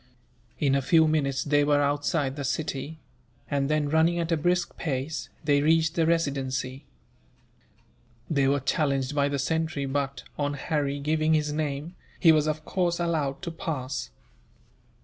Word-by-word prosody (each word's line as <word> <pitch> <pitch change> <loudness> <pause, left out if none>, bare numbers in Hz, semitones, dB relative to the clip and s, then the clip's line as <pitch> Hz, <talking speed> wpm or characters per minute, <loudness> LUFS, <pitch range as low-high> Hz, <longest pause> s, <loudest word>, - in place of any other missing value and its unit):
In 140 -2 +2
a 140 - +2
few 160 +3 +4
minutes 140 -4 0
they 145 0 +3
were 145 0 +3
outside 145 -1 0
the 145 - -4
city; 140 +2 -3 0.5
and 140 0 0
then, 155 -1 +1
running 160 +3 +3
at 170 0 -2
a - - +4
brisk 175 +3 0
pace, 145 +1 -3
they 145 -2 +3
reached 160 +1 +3
the 165 -2 +1
Residency. 135 -4 -1 1.4
They 140 -3 +2
were 140 0 +2
challenged 135 0 0
by 140 -1 +2
the 140 - -1
sentry 160 +1 -1
but, 140 0 -2 0.2
on 145 0 0
Harry 145 -1 -1
giving 155 +2 +2
his 150 -1 0
name, 150 +2 -3 0.3
he 165 - +7
was 155 -1 +3
of 155 0 -2
course 175 -2 0
allowed 155 -5 -1
to 170 - -3
pass. 140 - -4
145 Hz, 155 wpm, -27 LUFS, 140-160 Hz, 1.4 s, he